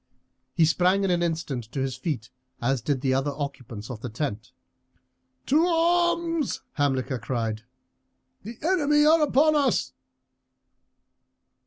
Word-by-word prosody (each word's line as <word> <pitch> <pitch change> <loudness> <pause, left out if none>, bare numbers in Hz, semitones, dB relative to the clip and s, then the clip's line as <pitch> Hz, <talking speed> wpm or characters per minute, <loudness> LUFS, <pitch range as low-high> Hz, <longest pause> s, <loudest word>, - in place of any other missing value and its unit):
He 165 - +5
sprang 180 +5 +2
in 195 - +1
an 175 -1 +1
instant 160 -8 -2
to 125 +5 -6
his 130 -1 -2
feet, 130 - -4 0.3
as 130 +1 0
did 135 +1 -1
the 135 -1 +1
other 135 +2 0
occupants 125 -6 -6
of 110 -3 -8
the 125 - -5
tent. 110 -2 -4 0.9
"To 300 +5 +3
arms!" 340 -2 +1
Hamilcar 130 -3 -1
cried; 115 -2 -3 0.8
"the 225 +3 -9
enemy 295 -4 +3
are 320 +1 +5
upon 300 +1 +3
us." 280 -5 +1
155 Hz, 130 wpm, -25 LUFS, -, 0.9 s, He